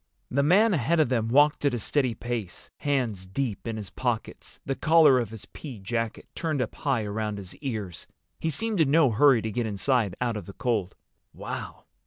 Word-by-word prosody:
The 140 Hz, -, +2 dB
man 195 Hz, +9 st, +4 dB
ahead 165 Hz, +2 st, +1 dB
of 155 Hz, -, +3 dB
them 115 Hz, -4 st, +1 dB
walked 145 Hz, +6 st, +4 dB
at 140 Hz, -4 st, +2 dB
a -, -, -1 dB
steady 125 Hz, +1 st, 0 dB
pace, 115 Hz, -6 st, -5 dB
hands 120 Hz, -10 st, -1 dB
deep 115 Hz, +2 st, -3 dB
in 115 Hz, -1 st, -3 dB
his 105 Hz, -3 st, -7 dB
pockets, -, -, -4 dB
the 135 Hz, -, -1 dB
collar 155 Hz, -3 st, +5 dB
of 120 Hz, -, -2 dB
his 110 Hz, -2 st, -9 dB
pea 135 Hz, -7 st, -9 dB
jacket 115 Hz, +3 st, -3 dB
turned 155 Hz, -4 st, -2 dB
up 125 Hz, -, -2 dB
high 135 Hz, -6 st, -1 dB
around 105 Hz, 0 st, -3 dB
his 95 Hz, -2 st, -9 dB
ears. 110 Hz, -, -5 dB, 0.3 s
He 160 Hz, -, -1 dB
seemed 210 Hz, +4 st, 0 dB
in 150 Hz, -, +3 dB
no 145 Hz, -3 st, +5 dB
hurry 125 Hz, +1 st, +5 dB
to 110 Hz, -, -2 dB
get 115 Hz, +2 st, -1 dB
inside 105 Hz, -1 st, 0 dB
out 120 Hz, -3 st, -1 dB
of 105 Hz, -, -8 dB
the 100 Hz, -, -8 dB
cold. 105 Hz, -7 st, -1 dB, 0.4 s
"Wow!" -, -, -6 dB
120 Hz, 200 wpm, -27 LUFS, 110-145 Hz, 0.4 s, collar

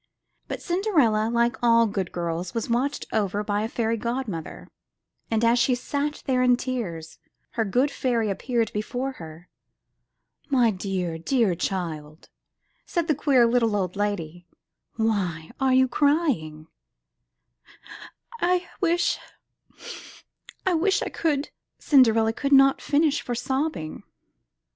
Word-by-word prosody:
But -, -, -6 dB
Cinderella, 300 Hz, -, +2 dB
like 235 Hz, 0 st, +1 dB
all 230 Hz, -1 st, +5 dB
good 200 Hz, -4 st, -3 dB
girls, 170 Hz, +2 st, -4 dB
was 230 Hz, 0 st, -2 dB
watched 265 Hz, +5 st, 0 dB
over 205 Hz, -1 st, 0 dB
by 205 Hz, 0 st, -1 dB
a 220 Hz, -, -1 dB
fairy 230 Hz, -1 st, -1 dB
godmother, 235 Hz, -8 st, -4 dB, 0.6 s
and 225 Hz, 0 st, +1 dB
as 235 Hz, +1 st, +4 dB
she 250 Hz, +1 st, +3 dB
sat 285 Hz, +4 st, -3 dB
there 255 Hz, -2 st, +1 dB
in 250 Hz, -1 st, +4 dB
tears, 190 Hz, -12 st, -5 dB, 0.3 s
her 230 Hz, -, 0 dB
good 250 Hz, +8 st, +1 dB
fairy 235 Hz, -6 st, 0 dB
appeared 230 Hz, +3 st, -1 dB
before 245 Hz, +5 st, -3 dB
her. 160 Hz, +2 st, -11 dB, 1.0 s
''My 240 Hz, -6 st, +3 dB
dear, 180 Hz, -3 st, -3 dB
dear 225 Hz, +1 st, +1 dB
child," 165 Hz, -4 st, -4 dB, 0.6 s
said 340 Hz, -2 st, -1 dB
the 310 Hz, -, +3 dB
queer 270 Hz, -4 st, +3 dB
little 230 Hz, -2 st, +2 dB
old 185 Hz, -2 st, -2 dB
lady, 175 Hz, -4 st, -3 dB, 0.5 s
"why 190 Hz, -8 st, -1 dB
are 265 Hz, -1 st, +3 dB
you 260 Hz, 0 st, +5 dB
crying?'' 250 Hz, -, 0 dB, 1.8 s
*'I 355 Hz, 0 st, +1 dB
wish 345 Hz, -1 st, +1 dB, 0.7 s
— -, -, -16 dB
I 375 Hz, -, +2 dB
wish 380 Hz, +4 st, +2 dB
I -, -, -3 dB
could 295 Hz, -3 st, -1 dB
— -, -, -60 dB
," -, -, -57 dB
Cinderella 225 Hz, -5 st, +4 dB
could 280 Hz, +4 st, -1 dB
not 270 Hz, 0 st, +6 dB
finish 295 Hz, 0 st, +2 dB
for 245 Hz, -, -4 dB
sobbing. 265 Hz, -, -3 dB
235 Hz, 135 wpm, -25 LUFS, 195-270 Hz, 1.8 s, not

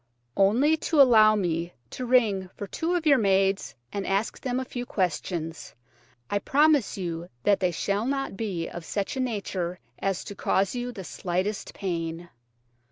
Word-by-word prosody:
"Only 250 Hz, +11 st, +4 dB
to 315 Hz, 0 st, 0 dB
allow 220 Hz, -5 st, +7 dB
me 170 Hz, -3 st, -1 dB, 0.2 s
to 255 Hz, -, -5 dB
ring 210 Hz, -7 st, +3 dB
for 205 Hz, -, -5 dB
two 330 Hz, -, -2 dB
of 340 Hz, -2 st, -1 dB
your 280 Hz, -4 st, +6 dB
maids 195 Hz, -1 st, +2 dB, 0.2 s
and 200 Hz, -, -2 dB
to -, -, -4 dB
ask 195 Hz, +3 st, -1 dB
them 255 Hz, -1 st, -1 dB
a 260 Hz, -, -3 dB
few 245 Hz, -1 st, -5 dB
questions. 175 Hz, -6 st, -3 dB, 0.5 s
I 205 Hz, -, 0 dB
promise 290 Hz, -2 st, +3 dB
you 170 Hz, -2 st, -4 dB
that 200 Hz, -1 st, +4 dB
they 180 Hz, -, +2 dB
shall 200 Hz, +6 st, -1 dB
not 275 Hz, -5 st, -2 dB
be 190 Hz, -6 st, -3 dB
of 175 Hz, -, -7 dB
such 200 Hz, +7 st, -3 dB
a -, -, -3 dB
nature 195 Hz, -7 st, -2 dB, 0.2 s
as 195 Hz, -2 st, -1 dB
to -, -, -7 dB
cause 195 Hz, 0 st, +1 dB
you 245 Hz, 0 st, -3 dB
the 195 Hz, -5 st, -8 dB
slightest 185 Hz, +4 st, -3 dB
pain." 170 Hz, -2 st, -3 dB
200 Hz, 170 wpm, -26 LUFS, 180-245 Hz, 0.5 s, allow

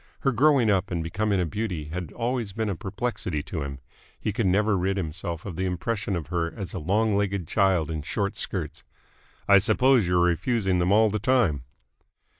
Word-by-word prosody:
Her 135 Hz, -, +2 dB
growing 130 Hz, -2 st, +4 dB
up 100 Hz, 0 st, +1 dB
and 85 Hz, -2 st, -2 dB
becoming 100 Hz, +4 st, 0 dB
a 90 Hz, -, +1 dB
beauty 85 Hz, -4 st, -4 dB
had 85 Hz, -1 st, -5 dB
always 120 Hz, -4 st, -2 dB
been 110 Hz, 0 st, -2 dB
a 100 Hz, -, -1 dB
perplexity 95 Hz, -5 st, -3 dB
to 80 Hz, -1 st, -5 dB
him. 70 Hz, -1 st, -5 dB, 0.4 s
He 110 Hz, -, -2 dB
could 105 Hz, -1 st, 0 dB
never 105 Hz, +3 st, +2 dB
rid 95 Hz, +1 st, 0 dB
himself 85 Hz, -1 st, -4 dB
of 90 Hz, -5 st, -6 dB
the 95 Hz, 0 st, -1 dB
impression 100 Hz, +3 st, -2 dB
of 80 Hz, -3 st, -5 dB
her 85 Hz, -2 st, -1 dB
as 95 Hz, -5 st, -7 dB
a 95 Hz, -, -3 dB
long 105 Hz, +6 st, +1 dB
legged 100 Hz, -4 st, -1 dB
child 95 Hz, -6 st, +2 dB
in 80 Hz, -1 st, -3 dB
short 100 Hz, +7 st, -2 dB
skirts. -, -, -4 dB, 0.6 s
"I 100 Hz, 0 st, +7 dB
suppose 115 Hz, +1 st, +3 dB
you're 90 Hz, 0 st, +2 dB
refusing 95 Hz, +2 st, +1 dB
them 90 Hz, +2 st, +1 dB
all 110 Hz, +1 st, +5 dB
the 105 Hz, -, -1 dB
time?" 115 Hz, -, +1 dB
95 Hz, 195 wpm, -26 LUFS, 85-110 Hz, 0.6 s, I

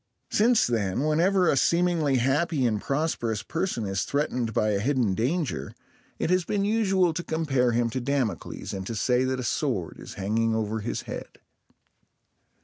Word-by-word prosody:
Since 230 Hz, +2 st, +4 dB
then, 110 Hz, 0 st, 0 dB
whenever 175 Hz, +5 st, +3 dB
a -, -, +4 dB
seemingly 170 Hz, -2 st, +2 dB
happy 135 Hz, +3 st, +1 dB
and 110 Hz, -3 st, 0 dB
prosperous 135 Hz, -7 st, -1 dB
person 165 Hz, -, -2 dB
is 95 Hz, -1 st, -1 dB
threatened 125 Hz, -5 st, -1 dB
by 110 Hz, 0 st, +1 dB
a 100 Hz, -, +1 dB
hidden 120 Hz, -3 st, +1 dB
danger, 125 Hz, -, -2 dB, 0.4 s
it -, -, -1 dB
has 185 Hz, 0 st, +3 dB
been 200 Hz, +3 st, -1 dB
usual 195 Hz, -5 st, +2 dB
to 175 Hz, -, -3 dB
compare 135 Hz, -8 st, +1 dB
him 120 Hz, 0 st, +2 dB
to 130 Hz, -, -2 dB
Damocles, 125 Hz, -8 st, -2 dB
and 95 Hz, -1 st, -5 dB
to 115 Hz, -, -4 dB
say 125 Hz, +3 st, +2 dB
that 130 Hz, 0 st, -1 dB
a -, -, -3 dB
sword 115 Hz, -, -2 dB
is -, -, -9 dB
hanging 110 Hz, +3 st, 0 dB
over 110 Hz, 0 st, -1 dB
his 110 Hz, +3 st, -3 dB
head. -, -, -8 dB
130 Hz, 165 wpm, -26 LUFS, 110-165 Hz, 0.4 s, Since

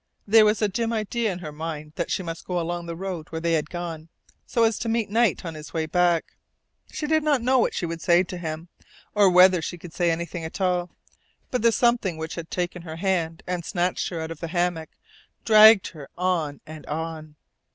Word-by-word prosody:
There 215 Hz, +1 st, +6 dB
was 210 Hz, +1 st, +2 dB
a -, -, +4 dB
dim 230 Hz, +3 st, -2 dB
idea 220 Hz, 0 st, -1 dB
in 180 Hz, -, -5 dB
her 150 Hz, -, -5 dB
mind 155 Hz, 0 st, -6 dB
that 170 Hz, -, -3 dB
she 185 Hz, -, -1 dB
must 165 Hz, -1 st, -6 dB
go 180 Hz, -1 st, -1 dB
along 175 Hz, 0 st, -3 dB
the 170 Hz, -, -5 dB
road 180 Hz, -3 st, -5 dB
where 160 Hz, -, -4 dB
they 170 Hz, 0 st, 0 dB
had 155 Hz, -1 st, 0 dB
gone, 165 Hz, -2 st, -6 dB, 0.4 s
so 230 Hz, -, +1 dB
as 225 Hz, -2 st, +2 dB
to 225 Hz, +1 st, -2 dB
meet 225 Hz, -3 st, -1 dB
Knight 230 Hz, -3 st, +2 dB
on 165 Hz, -, -4 dB
his 155 Hz, +2 st, -10 dB
way 160 Hz, -1 st, 0 dB
back. 175 Hz, 0 st, +1 dB, 0.5 s
She 305 Hz, -, -4 dB
did 315 Hz, +1 st, +2 dB
not 290 Hz, -5 st, +2 dB
know 255 Hz, +1 st, +3 dB
what -, -, +1 dB
she 175 Hz, -, -2 dB
should 165 Hz, 0 st, -5 dB
say 175 Hz, 0 st, +4 dB
to 180 Hz, 0 st, -7 dB
him, 160 Hz, 0 st, -5 dB, 0.4 s
or 205 Hz, -2 st, +5 dB
whether 180 Hz, 0 st, +6 dB
she 175 Hz, +3 st, -5 dB
could 170 Hz, -1 st, -11 dB
say 175 Hz, -2 st, +1 dB
anything 170 Hz, +1 st, -3 dB
at 160 Hz, +4 st, -6 dB
all; 180 Hz, -2 st, 0 dB, 0.6 s
but 250 Hz, -, 0 dB
the 230 Hz, +1 st, +5 dB
something 235 Hz, -7 st, +1 dB
which 160 Hz, 0 st, -5 dB
had 165 Hz, -1 st, -7 dB
taken 180 Hz, 0 st, -3 dB
her 160 Hz, -2 st, -8 dB
hand 165 Hz, -3 st, -1 dB
and 180 Hz, -1 st, -3 dB
snatched 180 Hz, +1 st, -1 dB
her 170 Hz, -, -5 dB
out 160 Hz, 0 st, -5 dB
of 165 Hz, -, -8 dB
the 165 Hz, -, -4 dB
hammock 175 Hz, -1 st, -1 dB, 0.6 s
dragged 215 Hz, -2 st, +7 dB
her 150 Hz, -5 st, -11 dB
on 170 Hz, -5 st, -1 dB
and 155 Hz, -1 st, -10 dB
on. 155 Hz, -1 st, -5 dB
175 Hz, 225 wpm, -24 LUFS, 165-200 Hz, 0.6 s, dragged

